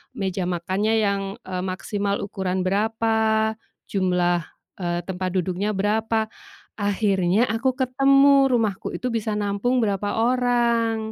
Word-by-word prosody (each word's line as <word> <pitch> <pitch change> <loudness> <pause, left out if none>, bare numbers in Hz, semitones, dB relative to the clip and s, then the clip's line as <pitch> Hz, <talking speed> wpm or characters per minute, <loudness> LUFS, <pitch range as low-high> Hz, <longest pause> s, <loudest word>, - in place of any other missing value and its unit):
meja 190 -1 -2
makannya 190 +5 -1
yang, 200 -1 +1 0.3
eee, 185 -1 -3
maksimal 200 +2 -2
ukuran 190 -2 -2
berapa, 220 +2 +1 0.4
jumlah, 180 -3 +1 0.3
eee, 175 -1 -1
tempat 185 0 -3
duduknya 185 +3 -1
berapa. 220 +2 0 0.4
Akhirnya 200 0 +1
aku 225 +5 0
ketemu, 275 +1 +4
rumahku 220 -5 0
itu 255 - -5
bisa 215 -1 -1
nampung 205 +5 0
berapa 205 -1 -1
orang. 240 -2 +2
205 Hz, 115 wpm, -23 LUFS, 190-225 Hz, 0.4 s, ketemu